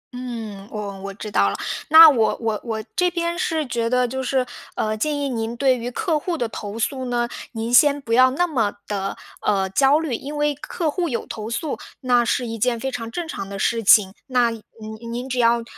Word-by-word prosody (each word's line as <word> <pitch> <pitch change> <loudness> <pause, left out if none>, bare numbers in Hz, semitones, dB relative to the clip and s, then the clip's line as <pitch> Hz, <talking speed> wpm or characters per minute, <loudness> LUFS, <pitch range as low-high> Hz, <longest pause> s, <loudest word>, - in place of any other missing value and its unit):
嗯， 225 -5 -6
我 200 -2 -6
我 200 0 -5
知 210 -1 -7
道 100 - +3
了。 100 - -3 0.3
那 320 +1 +11
我 235 -8 +3
我 220 -3 -2
我 220 -2 -4
这 360 -1 +3
边 340 0 -2
是 320 -4 0
觉 235 -2 -1
得 250 0 +2
就 265 +2 -4
是 260 0 0 0.3
呃， 215 0 -1
建 295 +7 -1
议 285 -1 -1
您 230 -2 -3
对 265 0 +3
于 240 0 -4
客 320 - -1
户 340 +2 -3
的 240 - -1
投 210 0 -6
诉 260 +3 -2
呢， 240 -1 0 0.3
您 225 +1 -3
先 285 +3 +6
不 230 -4 -4
要 255 +2 +6
那 290 +7 +1
么 230 -11 0
地， 195 -1 -3 0.2
呃， 195 -2 +1
焦 275 +7 +4
虑。 315 -6 -3
因 285 +5 -5
为 295 0 +1
客 305 +3 -3
户 345 0 -1
有 235 - -3
投 215 0 -6
诉， 285 +5 -3 0.2
那 245 -2 +3
是 245 +1 0
一 225 -1 -5
件 240 0 +1
非 265 +3 -3
常 230 -2 -5
正 340 +6 -4
常 195 -9 -6
的 200 - -6
事 230 +4 0
情。 195 -2 +6
那 245 -2 +2
您 225 -1 -8 0.5
您 245 +2 -4
只 250 -1 -2
要， 235 0 +3
245 Hz, 235 characters per minute, -22 LUFS, 225-280 Hz, 0.5 s, 那